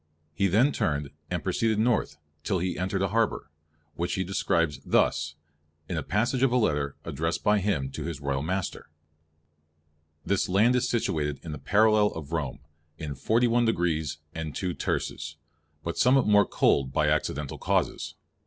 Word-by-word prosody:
He 100 +5 +2
then 115 +10 +4
turned, 75 - -1 0.2
and 90 -2 -2
proceeded 110 +3 +1
north 110 -8 +1 0.3
till 100 - 0
he 90 +1 -1
entered 95 +2 -1
a 95 - +1
harbour, 110 -8 0 0.4
which 85 +3 -2
he 95 - 0
describes 85 -5 0
thus, 80 - +1 0.5
in 90 - -3
a 80 - -1
passage 120 +6 0
of 135 -2 +4
a 125 - +3
letter 75 - 0
addressed 80 +1 -2
by 105 0 +4
him 90 -10 -1
to - - -5
his 80 -4 -4
Royal 70 -1 -1
master:— 90 +4 -3 1.4
"This 100 -2 +1
land 110 +7 +4
is 125 0 +1
situated 75 - -1
in 80 - -6
the 75 - -6
paralele 105 +7 +3
of 75 -2 -8
Rome, 70 -4 -3 0.4
in 75 -3 -5
forty 110 - +2
one 120 0 +3
degrees 80 -9 0 0.2
and 80 -2 -5
two 90 -2 -2
terces; 75 -1 -3 0.5
but 85 - -4
somewhat 130 +1 +5
more 105 -1 +5
colde 65 -2 +2
by 75 - +2
accidentall 75 -2 -1
causes. - - -1
90 Hz, 165 wpm, -27 LUFS, 75-105 Hz, 1.4 s, somewhat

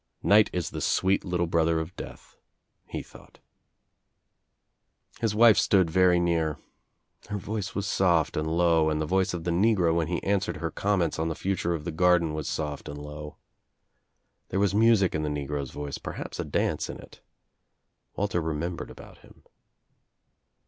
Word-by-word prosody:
"Night 105 +1 +5
is 90 -3 -3
the - - -5
sweet 95 +1 +2
little 90 -2 0
brother 80 -1 +2
of 80 +3 -6
Death," - - -10 0.7
thought. - - -17 1.8
His 110 -2 0
wife 115 -1 +7
stood 95 -5 +3
very 90 0 +4
near. 85 -3 0 0.7
Her 105 - -2
voice 100 0 -4
was 100 - -2
soft 85 -5 +2
and 75 0 -1
low 80 -1 +3
and 75 0 -1
the 80 - -1
voice 95 +2 +1
of 85 - -5
the 85 - -1
negro 90 -2 +3
when 85 -2 0
he 85 0 -2
answered 100 +1 0
hei 80 -1 -3
comments 95 -6 0
on 80 - 0
the 80 - -3
future 90 -2 -1
of 75 -1 -7
the 85 - -2
garden 85 -1 +3
was 75 -1 -3
soft 75 -2 -4
an( 75 - -6
low. 75 0 -8 1.1
There 95 - -1
was 100 -1 +2
music 110 -3 +4
in 75 - -1
the 75 - -2
negro's 70 -1 -3
voice, 75 -1 -6
perhaps; - - -7
dance - - -1
in - - -6
it. - - -15 0.9
Walter 95 -3 -1
remembered 80 +2 -3
about - - -13
him. - - -20
85 Hz, 160 wpm, -27 LUFS, 80-95 Hz, 1.8 s, wife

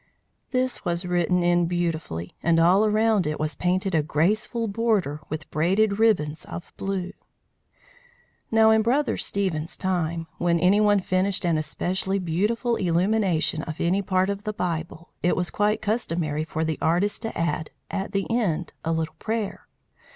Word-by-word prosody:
This 255 -1 -1
was 175 +1 -2
written 180 0 +1
in 175 0 +3
beautifully, 165 - -2
and 165 -1 +3
all 180 +5 +5
around 215 -3 +2
it 150 - -2
was 155 0 -1
painted 185 +4 0
a 160 - +4
graceful 210 +10 0
border 200 -8 0
like 155 -1 -5
braided 200 +7 +2
ribbons 165 -9 +2
of 175 - -8
blue. 190 -1 -3 1.4
Now 220 0 +5
in 220 0 +5
Brother 260 +6 +1
Stephen's 175 -5 -2
time, 170 -3 -1
when 170 -1 +2
any 190 +5 +4
one 205 -1 +4
finished 185 +1 0
an 170 -2 +2
especially 185 +6 -1
beautiful 210 +7 0
illumination 180 -2 +1
of 155 -1 -6
any 185 +4 +2
part 185 0 +1
of 200 0 -5
the 215 -1 -3
Bible, 170 -3 -4
it 180 - +2
was 180 -1 -1
quite 210 +1 +1
customary 165 -9 -1
for 160 0 -2
the 160 -1 -2
artist 180 +7 +1
to 225 - -5
add, 165 -1 -1 0.2
at 195 0 -3
the 195 -1 0
end, 185 -9 -1
a 165 - -1
little 160 -1 -2
prayer. 220 -2 -3
180 Hz, 160 wpm, -25 LUFS, 165-210 Hz, 1.4 s, all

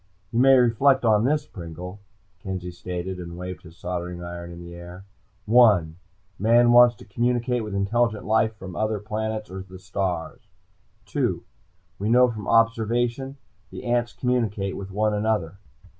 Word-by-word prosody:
"You 115 - 0
may 135 +1 +7
reflect 125 +2 +3
on 110 0 +4
this, 150 +2 +1
Pringle," 90 +2 -9 0.4
Kenzie 90 -1 -5
stated 90 +1 -5
and 85 -1 -8
waved 90 -2 -6
his 85 +1 -15
soldering 90 0 -5
iron 85 0 -7
in 85 - -10
the 85 0 -10
air. 90 +2 -10 0.4
"One: 105 -9 +4 0.4
Man 120 +3 +5
wants 120 0 +7
to - - -15
communicate 120 +2 0
with 105 -2 -5
intelligent 110 +2 0
life 110 0 +2
from 95 -4 -9
other 110 +3 0
planets 110 0 -4
or 95 0 -6
the 95 0 -11
stars. 95 -3 -4 0.6
"Two: - - -1 0.6
We 105 +2 -1
know 125 +1 +5
from 105 -3 -7
observation 115 +4 +1 0.3
the - - -9
ants 120 -1 0
communicate 110 -6 -1
with 100 -1 -7
one 105 +2 0
another. 105 -4 -1
105 Hz, 155 wpm, -24 LUFS, 90-120 Hz, 0.6 s, may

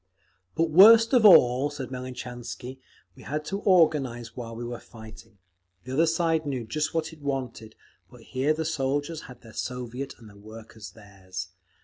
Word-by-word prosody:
"But 165 -1 0
worst 225 - +8
of 240 -4 +5
all," 130 -5 +6
said 145 -4 -7
Melnichansky, 125 0 -7 0.4
"we - - -15
had 150 +2 -4
to 195 +5 -4
organise 145 - +2
while 115 -2 -7
we 120 - -6
were 120 0 -6
fighting. 110 -1 -14 0.5
The 130 - -7
other 165 +5 +3
side 165 -1 +1
knew 135 -5 -4
just 150 +9 -3
what 160 0 -2
it 155 - -16
wanted; 130 -6 -5 0.3
but - - -16
here 135 +4 -1
the 160 0 -3
soldiers 145 +1 -2
had 125 -1 -13
their 110 -2 -15
Soviet 125 +2 -5
and 115 - -15
the 105 - -16
workers 110 0 -12
theirs…. 95 -3 -9
130 Hz, 165 wpm, -26 LUFS, 115-155 Hz, 0.5 s, worst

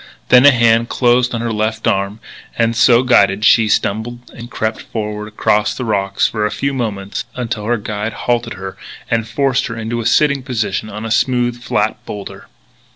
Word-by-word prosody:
Then 125 +2 +7
a - - +9
hand 115 -2 +3
closed 125 0 +2
on 115 - -3
her 115 -1 -2
left 110 +1 -2
arm 100 +2 -1 0.4
and, 115 0 +1
so 120 +1 +5
guided, 100 -4 +3
she 115 0 +5
stumbled 110 +4 -2
and 120 0 -10
crept 110 -1 -3
forward 105 -1 -5
across 105 0 0
the 125 - -4
rocks 100 -2 0
for 110 -2 -3
a 105 - +1
few 140 +5 -2
moments 110 -1 -4
until 115 -4 -4
her 120 +2 +1
guide 105 +1 -4
halted 120 -1 -2
her 95 -1 -7 0.4
and 115 -1 0
forced 135 +3 0
her 115 -2 -6
into 115 +1 -3
a 115 - -1
sitting 140 +2 +3
position 110 -5 -3
on 105 +2 -7
a 110 - -4
smooth, 120 0 +1
flat 110 -3 -1
boulder. 100 -1 -8
115 Hz, 185 wpm, -17 LUFS, 105-120 Hz, 0.4 s, a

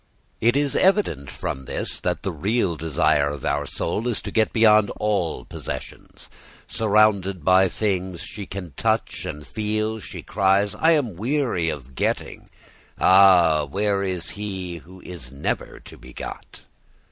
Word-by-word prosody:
It 120 +4 +3
is 145 -1 0
evident 185 - +2
from 65 0 -5
this - - -3
that - - -2
the - - -1
real 100 -4 0
desire 75 -2 +1
of 70 -2 -6
our 75 0 0
soul 115 +3 -2
is 120 -4 -1
to - - -5
get 110 -1 +2
beyond 110 -2 +5
all 100 -6 0
our - - -17
possessions. - - -8 0.4
Surrounded 100 -5 +2
by 95 +1 +5
things 95 -4 -2
she 100 -3 -8
can 90 -5 -7
touch - - -1
and 75 0 -6
feel, 110 - -2
she - - -9
cries, 100 +1 +2
"I 160 +10 +3
am 125 - 0
weary 120 - 0
of 65 -4 -7
getting; - - -3 0.5
ah, 90 -5 +6
where 100 +4 0
is 90 -4 -2
he 95 -4 -5
who 90 +3 -14
is 80 -9 -9
never 70 +2 -3
to - - -13
be 65 0 -13
got?" - - -9
95 Hz, 155 wpm, -23 LUFS, 80-110 Hz, 0.5 s, ah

